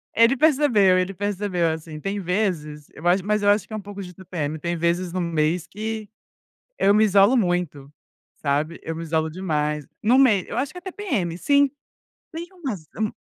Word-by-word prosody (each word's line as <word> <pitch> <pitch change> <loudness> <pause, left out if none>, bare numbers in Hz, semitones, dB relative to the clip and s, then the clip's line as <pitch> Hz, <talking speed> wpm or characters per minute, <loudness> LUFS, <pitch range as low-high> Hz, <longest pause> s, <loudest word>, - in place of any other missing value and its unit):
ele 230 +4 +5
percebeu, 260 -11 +4
ele 185 +2 0
percebeu, 195 -3 -1
assim, 160 -1 -7
tem 195 +4 -3
vezes 175 -6 -2
eu 165 +4 -5
ach 185 +2 +4
mas 210 +2 0
eu 205 - +4
acho 205 -1 +3
que 220 - -10
é - - -2
um 215 - -4
pouco 200 0 -8
de 180 -1 -9
TPM, 160 -4 -4
tem 170 +1 -2
vezes 170 +1 0
no 185 0 -2
mês 165 +1 0
que 215 0 -5 0.7
eu 200 - +4
me 215 +1 +5
isolo 205 +4 +5
muito, 175 -8 -1 0.5
sabe, 150 +3 -1
eu 165 - -4
me 165 - -5
isolo 160 0 0
demais. 150 -4 -2 0.2
No 235 +5 +4
mei 225 -9 +4
eu - - -5
acho 270 +2 -1
que 360 - -11
é - - -24
TPM, 345 - -3
sim. 285 +4 +3 0.6
Tem 335 +2 -5
umas 250 - -6
um 215 -1 0
185 Hz, 195 wpm, -23 LUFS, 165-215 Hz, 0.7 s, ele